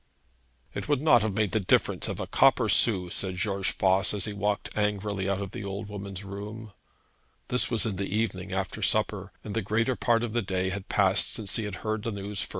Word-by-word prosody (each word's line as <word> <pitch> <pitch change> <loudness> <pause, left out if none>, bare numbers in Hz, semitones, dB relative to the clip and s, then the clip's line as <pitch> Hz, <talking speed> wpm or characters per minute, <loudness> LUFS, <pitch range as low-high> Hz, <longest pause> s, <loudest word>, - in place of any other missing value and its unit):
'It - - -5
would 145 -3 +3
not 150 -5 +5
have 105 -2 -1
made 105 -3 +1
the 110 - +1
difference 95 - +2
of - - -4
a - - -2
copper - - +4
sou,' 90 -6 +4
said 95 -2 -2
George 100 0 -1
Voss, 95 +1 +2
as 100 - 0
he 105 - -4
walked 100 0 -2
angrily 105 -2 -1
out 100 -1 0
of 100 -1 -5
the 115 -1 -6
old 100 +1 -5
woman's 100 -1 -6
room. 105 +2 -8 0.8
This 125 - +3
was 115 -3 +1
in 105 -4 -2
the 100 0 -3
evening, 110 +2 -2
after - - -3
supper, - - +1
and 105 - -6
the 115 - 0
greater 115 +5 0
part 120 -1 +2
of 115 -2 -3
the 120 - +1
day 95 -2 -1
had 95 0 -6
passed 100 0 +3
since 105 -4 -4
he 110 - -1
had 105 -2 -4
first - - -12
heard 110 -1 -1
the 115 +1 -3
news. 100 0 -3
105 Hz, 225 wpm, -27 LUFS, 95-110 Hz, 0.8 s, not